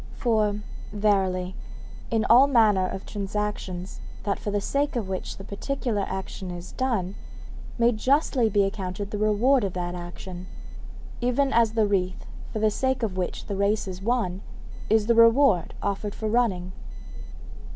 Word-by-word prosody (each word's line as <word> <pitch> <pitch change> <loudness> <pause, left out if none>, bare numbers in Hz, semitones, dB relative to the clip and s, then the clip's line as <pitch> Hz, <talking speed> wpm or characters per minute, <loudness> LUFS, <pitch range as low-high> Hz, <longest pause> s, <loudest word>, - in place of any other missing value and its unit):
For, 215 -3 +1 0.3
verily, 190 -3 +1 0.5
in 225 -1 +1
all 255 +4 +7
manner 215 -8 +4
of 190 - -6
transactions 200 -3 -4 0.2
that 200 -2 -1
for - - -4
the 205 0 0
sake 280 +7 -1
of 225 -5 -1
which 190 -1 -4
the 195 - -9
particular 215 +1 -2
action 190 0 -5
is 175 0 -7
done 225 -8 -1 0.6
may 235 0 +4
justly 255 0 +2
be 205 -1 +3
accounted 195 0 -3
the 210 - -3
reward 220 +5 +3
of 195 -3 -2
that 175 -1 -3
action, 180 +1 -8 0.7
even 250 +3 +1
as 230 -1 +4
the 220 -2 +3
wreath 185 -3 -1 0.3
for - - -4
the 215 0 +2
sake 260 +2 0
of 205 -5 -1
which 180 -1 -3
the 200 - -4
race 200 +1 +1
is 185 0 -6
run 205 -4 0 0.5
is 220 -1 +4
the 235 - +4
reward 230 - +5
offered 200 +1 -2
for 220 - -3
running. 210 -6 +1
210 Hz, 155 wpm, -26 LUFS, 190-230 Hz, 0.7 s, all